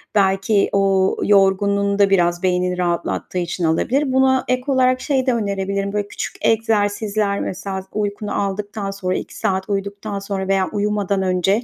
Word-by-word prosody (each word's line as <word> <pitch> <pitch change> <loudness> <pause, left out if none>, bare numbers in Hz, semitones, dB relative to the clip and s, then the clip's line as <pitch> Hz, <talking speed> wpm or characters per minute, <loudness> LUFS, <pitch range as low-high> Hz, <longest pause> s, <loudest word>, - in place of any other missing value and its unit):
Belki 195 +1 +2
o 195 -1 +2
yorgunluğunu 200 0 +3
da 200 -1 +5
biraz 175 -2 +2
beynini 180 0 +1
rahatlattığı 175 0 -2
için 175 0 -2
alabilir. 260 - +1
Buna 260 0 +3
ek 255 0 +1
olarak 255 -2 +2
şeyi 265 -3 0
de 255 - +2
önerebilirim, 200 -2 -2
böyle 205 -1 -1
küçük - - -5
egzersizler, 210 -2 +1
mesela, 190 0 -4
uykunu 205 0 -2
aldıktan 200 0 -3
sonra, 185 -2 -2
2 - - -6
saat 190 +1 -1
uyuduktan 200 +1 -3
sonra 195 -1 -4
veya 190 -1 +2
uyumadan 205 -1 0
önce 190 +4 +1
200 Hz, 150 wpm, -20 LUFS, 190-210 Hz, -, da